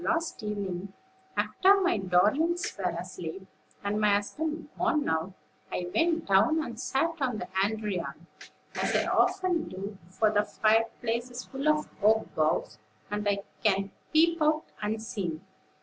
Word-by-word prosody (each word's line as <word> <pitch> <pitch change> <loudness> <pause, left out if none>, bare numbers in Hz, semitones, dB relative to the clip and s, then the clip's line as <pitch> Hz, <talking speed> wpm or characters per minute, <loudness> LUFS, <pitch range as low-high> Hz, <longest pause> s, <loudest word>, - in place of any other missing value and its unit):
Last 330 -4 -1
evening, 200 -3 -4 0.4
after 395 +1 +4
my 365 - +2
darlings 215 - +2
were 185 -2 -1
asleep, 180 +1 -6 0.4
and 205 +1 0
my 210 -1 +4
husband 310 +10 -2
gone 300 -2 +1
out, 160 +4 -1 0.4
I 175 0 -3
went 330 0 +2
down 200 +12 +4
and 230 -5 -7
sat 325 +5 0
on 250 -4 0
the 230 - -5 0.2
andiron, 210 -4 -3 0.5
as - - 0
I - - +3
often 355 -3 +2
do; 195 +1 -7
for 210 +3 +2
the 205 -1 +4
fireplace 225 +3 +1
is 245 0 -7
full 275 +2 -4
of 305 0 +2
oak 220 +2 +3
boughs, 155 -8 0 0.3
and 210 0 0
I 200 0 0 0.2
can 195 -2 +2 0.2
peep 330 +1 +4
out 310 +1 +3 0.2
unseen. 210 -5 -3
215 Hz, 145 wpm, -29 LUFS, 195-305 Hz, 0.5 s, after